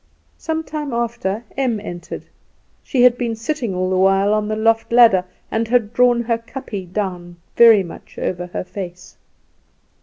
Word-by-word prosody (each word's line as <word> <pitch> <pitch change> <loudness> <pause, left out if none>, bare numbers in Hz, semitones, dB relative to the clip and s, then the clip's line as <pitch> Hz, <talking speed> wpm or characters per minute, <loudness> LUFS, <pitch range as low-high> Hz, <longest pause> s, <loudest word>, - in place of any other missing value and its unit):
Some 320 0 -2
time 295 -3 -5
after 235 -3 -2
Em 255 -5 0
entered; 175 -4 -8 0.6
she 250 -2 +1
had 245 -1 +5
been 235 -2 -1
sitting 230 -3 -3
all 185 0 0
the - - +1
while 195 +2 +3
on 215 0 0
the 215 - -1
loft 225 +1 +1
ladder, 230 -6 +6 0.3
and 225 +1 0
had 230 -2 +1
drawn 245 0 +3
her 230 0 0
kapje 225 -6 -7
down 180 -3 -4 0.2
very 225 -4 +7
much 170 - -12
over 180 -1 -3
her 180 - -4
face. 185 -1 -8
220 Hz, 160 wpm, -20 LUFS, 190-240 Hz, 0.6 s, very